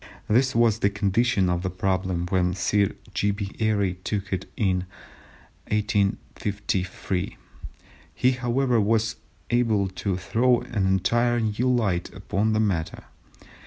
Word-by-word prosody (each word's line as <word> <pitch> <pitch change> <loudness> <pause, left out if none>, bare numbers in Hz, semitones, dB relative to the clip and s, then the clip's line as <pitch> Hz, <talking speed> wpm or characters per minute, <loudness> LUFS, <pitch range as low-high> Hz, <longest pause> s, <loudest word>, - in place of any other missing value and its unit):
This 125 +4 +2
was 115 -2 +3
the 100 - +3
condition 100 +1 +1
of 90 -1 0
the 95 - -2
problem 95 -1 -1
when 90 -1 +1
Sir 100 +1 +1 0.2
G. 100 - +1
B. 100 -1 -3
Airy 100 -5 +1
took 100 -2 -3
it 90 -1 -2
up - - -26
in 95 -6 +2 0.9
1853. 100 -3 -1 0.8
He, 130 - +3
however, 125 -1 +1
was 110 +1 +1 0.3
able 115 -5 +2
to 95 +1 -2
throw 120 +6 +2
an 100 -5 -1
entirely 115 +4 +2
new 125 +1 +3
light 100 -8 0
upon 105 +4 0
the 110 - +2
matter. 95 -7 -1
100 Hz, 130 wpm, -25 LUFS, 95-115 Hz, 0.9 s, was